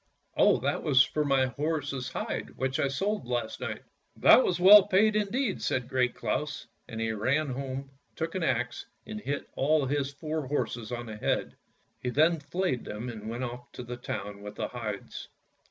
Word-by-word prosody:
" -, -, -47 dB
" -, -, -41 dB
Oh, -, -, +5 dB
that 140 Hz, +3 st, 0 dB
was 140 Hz, -4 st, +5 dB
for 150 Hz, -, -1 dB
my 135 Hz, -2 st, +3 dB
horse's 145 Hz, -1 st, -2 dB
hide -, -, -4 dB
which 130 Hz, +1 st, -1 dB
I -, -, +2 dB
sold 195 Hz, -, -2 dB
last 120 Hz, -2 st, -2 dB
night." -, -, -5 dB, 0.2 s
" -, -, -44 dB
That -, -, +9 dB
was 175 Hz, -1 st, 0 dB
well 195 Hz, +2 st, +9 dB
paid 210 Hz, +3 st, +4 dB
indeed," 215 Hz, +1 st, 0 dB
said 125 Hz, -2 st, -1 dB
Great 125 Hz, -2 st, +1 dB
Claus, 145 Hz, +6 st, -2 dB, 0.2 s
and 110 Hz, -, -6 dB
he 115 Hz, 0 st, 0 dB
ran 130 Hz, +8 st, 0 dB
home, 135 Hz, +1 st, -5 dB, 0.2 s
took 165 Hz, +1 st, -3 dB
an 185 Hz, -, -2 dB
axe 125 Hz, -6 st, -1 dB, 0.2 s
and 215 Hz, 0 st, -6 dB
hit 145 Hz, -6 st, -3 dB
all 150 Hz, +1 st, +2 dB
his 140 Hz, 0 st, -1 dB
four 155 Hz, 0 st, -4 dB
horses 120 Hz, -5 st, -2 dB
on 120 Hz, -1 st, -4 dB
the 110 Hz, -2 st, -7 dB
head. -, -, -1 dB, 0.5 s
He 125 Hz, -, -2 dB
then 160 Hz, +5 st, +3 dB
flayed 150 Hz, -3 st, -2 dB
them 110 Hz, +4 st, -5 dB
and 110 Hz, -2 st, -7 dB
went 120 Hz, +3 st, -4 dB
off 125 Hz, 0 st, -6 dB
to -, -, -7 dB
the 120 Hz, +1 st, -6 dB
town 100 Hz, -4 st, -5 dB
with 105 Hz, 0 st, -8 dB
the -, -, -3 dB
hides. -, -, -6 dB
135 Hz, 200 wpm, -29 LUFS, 120-155 Hz, 0.5 s, That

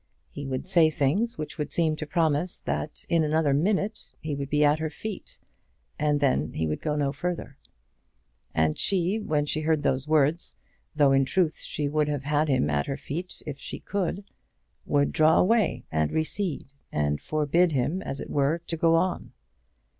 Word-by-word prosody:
He 140 Hz, -1 st, -6 dB
would 130 Hz, -1 st, -3 dB
say 170 Hz, -4 st, +5 dB
things 160 Hz, -, 0 dB
which 155 Hz, +1 st, -6 dB
would 150 Hz, -, -3 dB
seem 160 Hz, -2 st, +2 dB
to 155 Hz, -, -5 dB
promise 160 Hz, +1 st, 0 dB
that 150 Hz, -, -4 dB
in 165 Hz, -1 st, +2 dB
another 155 Hz, -1 st, +2 dB
minute 200 Hz, -, 0 dB
he 155 Hz, -1 st, -4 dB
would 140 Hz, -1 st, -4 dB
be 150 Hz, +1 st, +3 dB
at 145 Hz, +1 st, +3 dB
her 160 Hz, 0 st, -2 dB
feet, 205 Hz, +6 st, -7 dB, 0.6 s
and 150 Hz, 0 st, +2 dB
then 130 Hz, -, +1 dB
he 80 Hz, -, -1 dB
would 75 Hz, -1 st, -2 dB
go 150 Hz, -2 st, -1 dB
no 145 Hz, -2 st, 0 dB
further. 175 Hz, -6 st, -4 dB, 0.9 s
And 80 Hz, -1 st, +1 dB
she, 190 Hz, +2 st, +1 dB
when 155 Hz, -8 st, 0 dB
she 155 Hz, +1 st, -1 dB
heard 155 Hz, -1 st, +1 dB
those 135 Hz, 0 st, 0 dB
words, 155 Hz, +2 st, +1 dB, 0.4 s
though 145 Hz, -3 st, +4 dB
in 135 Hz, 0 st, +4 dB
truth 165 Hz, +3 st, 0 dB
she 150 Hz, -2 st, -2 dB
would 150 Hz, +1 st, +1 dB
have 145 Hz, -2 st, -2 dB
had 150 Hz, +2 st, +1 dB
him 130 Hz, -, +2 dB
at 75 Hz, -1 st, 0 dB
her 135 Hz, -, -2 dB
feet 175 Hz, +6 st, -6 dB
if 140 Hz, -2 st, -6 dB
she -, -, -6 dB
could, 200 Hz, 0 st, -2 dB, 0.6 s
would 145 Hz, -1 st, +2 dB
draw 155 Hz, 0 st, +4 dB
away, 185 Hz, -, +2 dB
and 80 Hz, -1 st, +1 dB
recede, 160 Hz, +2 st, -2 dB, 0.3 s
and 75 Hz, -1 st, 0 dB
forbid 155 Hz, +3 st, +2 dB
him 145 Hz, +8 st, 0 dB
as 135 Hz, -, -5 dB
it -, -, -7 dB
were 145 Hz, +3 st, +2 dB
to 165 Hz, -, -3 dB
go 165 Hz, +1 st, +4 dB
on. 180 Hz, +2 st, -1 dB
150 Hz, 185 wpm, -26 LUFS, 140-170 Hz, 0.9 s, say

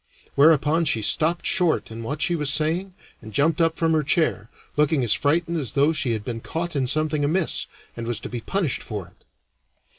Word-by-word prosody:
Whereupon 155 Hz, +2 st, +4 dB
she 110 Hz, -7 st, 0 dB
stopped 160 Hz, +10 st, +2 dB
short 175 Hz, -9 st, +1 dB
in 115 Hz, +1 st, -7 dB
what 145 Hz, +7 st, -3 dB
she 175 Hz, -, +1 dB
was 150 Hz, -3 st, 0 dB
saying 170 Hz, +6 st, 0 dB, 0.3 s
and 110 Hz, -, -10 dB
jumped 155 Hz, -, +1 dB
up 165 Hz, 0 st, +2 dB
from 165 Hz, -1 st, +1 dB
her 155 Hz, -, +3 dB
chair, 150 Hz, -, 0 dB, 0.3 s
looking 150 Hz, -2 st, +2 dB
as 110 Hz, -3 st, +3 dB
frightened 165 Hz, +3 st, 0 dB
as 135 Hz, -6 st, -3 dB
though 145 Hz, +3 st, +3 dB
she 130 Hz, -6 st, 0 dB
had 105 Hz, -2 st, -4 dB
been 115 Hz, -2 st, -5 dB
caught 165 Hz, +4 st, -4 dB
in 135 Hz, -2 st, 0 dB
something 155 Hz, +1 st, 0 dB
amiss, 165 Hz, +4 st, 0 dB, 0.3 s
and 115 Hz, -1 st, -6 dB
was 120 Hz, -3 st, -1 dB
to -, -, -6 dB
be 120 Hz, -1 st, -5 dB
punished 180 Hz, -, -1 dB
for 100 Hz, -6 st, -6 dB
it. -, -, -31 dB
150 Hz, 205 wpm, -23 LUFS, 120-165 Hz, 0.3 s, Whereupon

